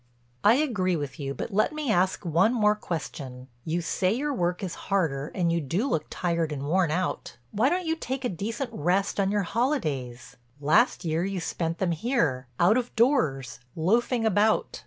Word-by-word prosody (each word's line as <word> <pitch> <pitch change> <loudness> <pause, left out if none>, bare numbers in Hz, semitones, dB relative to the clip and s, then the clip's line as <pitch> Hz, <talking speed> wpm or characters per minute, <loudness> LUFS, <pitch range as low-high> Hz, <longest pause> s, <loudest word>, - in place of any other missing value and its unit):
"I 215 +3 +6
agree 215 - +1
with 145 0 -5
you 140 -1 -4
but 220 - -5
let 215 +9 +2
me 305 -6 -1
ask 185 0 +1
one 175 +9 +3
more 210 -2 +4
question. 135 -9 -6 0.2
You 165 +2 -1
say 185 +2 0
your 285 +6 -1
work 180 -5 -1
is 185 - -3 0.2
harder 155 -7 0
and 175 -3 +1
you 170 - 0
do 175 - -1
look 155 - -1
tired 170 -3 -1
and 140 -2 -4
worn 175 +3 +2
out. 180 +4 -2
Why 230 +6 +2
don't 360 +2 -1
you 320 0 0
take 265 -4 -4
a - - +1
decent 225 - -4
rest 190 +5 0
on 195 -1 +2
your 205 0 +1
holidays? 160 - -2 0.2
Last 175 - +3
year 165 +1 0
you 195 0 -2
spent 165 0 -3
them 185 -3 0
here, 160 - 0
out 185 +7 +5
of 245 -1 -3
doors, 155 - +1 0.2
loafing 225 +7 +1
about. 215 +1 +2
185 Hz, 185 wpm, -26 LUFS, 160-230 Hz, 0.2 s, I